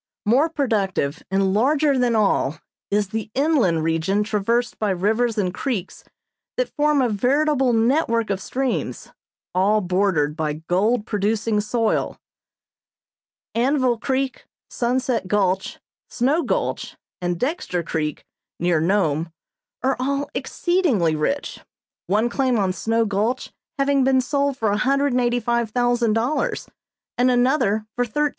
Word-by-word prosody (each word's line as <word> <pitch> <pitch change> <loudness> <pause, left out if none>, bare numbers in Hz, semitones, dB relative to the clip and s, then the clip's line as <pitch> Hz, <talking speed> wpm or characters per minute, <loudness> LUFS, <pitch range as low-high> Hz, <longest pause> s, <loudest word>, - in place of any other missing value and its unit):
More 265 +10 +3
productive 200 - -1
and 195 0 +1
larger 280 +6 +2
than 245 -2 +2
all 195 -8 +1 0.3
is 205 -1 0
the 220 +1 -4
inland 260 - +2
region 165 +6 +1
traversed 225 +3 -1
by 215 - 0
rivers 220 +5 +1
and 185 -3 0
creeks 195 -3 -4 0.5
that - - -1
form 295 -2 +3
a 245 - +1
veritable 265 +5 +2
network 230 -1 +1
of 195 -1 -2
streams, 265 +3 -3 0.4
all 200 +4 +3
bordered 180 -6 +1
by 155 -2 -1
gold 190 +9 0
producing 210 +1 0
soil. 225 +1 -1 1.4
Anvil 255 -1 +1
Creek, 265 +1 -2 0.3
Sunset 245 -3 -1
Gulch, 190 -2 0 0.3
Snow 280 +7 +1
Gulch - - -2 0.2
and 175 -1 -2
Dexter 250 - -2
Creek, 155 -2 -3 0.3
near 175 -2 +2
Nome, 165 -3 +1 0.5
are 265 0 +2
all 280 +2 -1
exceedingly 280 - +1
rich; 275 - -2 0.5
one 215 +4 +2
claim 255 0 +1
on 190 -3 +1
Snow 225 +6 0
Gulch 215 +5 -1 0.2
having 275 -1 +2
been 265 0 +3
sold 280 +1 0
for 220 -4 0
$185,000, 245 -1 +1 0.5
and 250 +1 +4
another 245 -4 +2
for 245 - +1
$13,000. 295 +6 0
230 Hz, 120 wpm, -22 LUFS, 195-260 Hz, 1.4 s, and